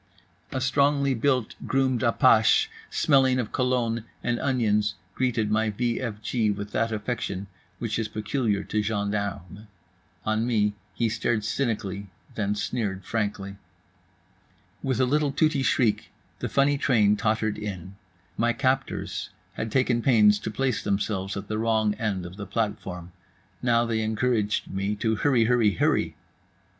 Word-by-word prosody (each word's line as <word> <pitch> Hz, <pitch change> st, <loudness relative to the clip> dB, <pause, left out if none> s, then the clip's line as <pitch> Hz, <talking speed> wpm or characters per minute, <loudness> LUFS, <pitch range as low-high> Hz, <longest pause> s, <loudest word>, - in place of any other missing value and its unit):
A 130 Hz, -, -2 dB
strongly 140 Hz, +1 st, +2 dB
built, 125 Hz, -1 st, +1 dB
groomed 130 Hz, -2 st, +1 dB
apache 115 Hz, -2 st, +4 dB, 0.2 s
smelling 130 Hz, -3 st, +3 dB
of 120 Hz, -4 st, -2 dB
cologne 125 Hz, -3 st, 0 dB, 0.2 s
and 120 Hz, -1 st, 0 dB
onions 105 Hz, -6 st, +1 dB, 0.2 s
greeted 115 Hz, -4 st, 0 dB
my 110 Hz, +1 st, +2 dB
v 120 Hz, +3 st, -1 dB
f 115 Hz, -5 st, -4 dB
g 110 Hz, -2 st, +1 dB
with 100 Hz, 0 st, -3 dB
that 115 Hz, +2 st, 0 dB
affection 105 Hz, -3 st, -3 dB, 0.3 s
which 115 Hz, -2 st, -2 dB
is 110 Hz, -, -1 dB
peculiar 105 Hz, 0 st, -1 dB
to 105 Hz, -, -1 dB
gendarmes. 100 Hz, -2 st, -3 dB, 0.6 s
On 110 Hz, +2 st, +1 dB
me 105 Hz, -4 st, +2 dB, 0.2 s
he 115 Hz, -, +1 dB
stared 110 Hz, 0 st, 0 dB
cynically, 105 Hz, -5 st, -2 dB, 0.3 s
then 105 Hz, -1 st, -1 dB
sneered 100 Hz, -2 st, -3 dB
frankly. 100 Hz, -3 st, -3 dB, 1.2 s
With 130 Hz, -3 st, -1 dB
a 130 Hz, -, +4 dB
little 145 Hz, +2 st, +1 dB
tooty 150 Hz, 0 st, +2 dB
shriek 130 Hz, -5 st, +1 dB, 0.3 s
the -, -, -3 dB
funny 140 Hz, 0 st, +2 dB
train 105 Hz, -7 st, +3 dB
tottered 110 Hz, -1 st, 0 dB
in. 95 Hz, -3 st, -6 dB, 0.4 s
My 120 Hz, +1 st, +2 dB
captors 130 Hz, +2 st, -1 dB, 0.2 s
had 110 Hz, -, -4 dB
taken 125 Hz, -1 st, +2 dB
pains 105 Hz, -5 st, +5 dB
to -, -, -4 dB
place 130 Hz, +2 st, -1 dB
themselves 100 Hz, -1 st, -1 dB
at 100 Hz, +1 st, -6 dB
the 110 Hz, 0 st, -2 dB
wrong 110 Hz, -2 st, +2 dB
end 100 Hz, -5 st, -2 dB
of 90 Hz, +2 st, -9 dB
the 100 Hz, -, -6 dB
platform. 90 Hz, -6 st, -3 dB, 0.5 s
Now 120 Hz, -1 st, +3 dB
they 115 Hz, -1 st, 0 dB
encouraged 110 Hz, -1 st, 0 dB
me 100 Hz, +2 st, -2 dB
to 110 Hz, +1 st, 0 dB
HurryHurryHurry. 115 Hz, -, +2 dB
110 Hz, 140 wpm, -26 LUFS, 105-125 Hz, 1.2 s, pains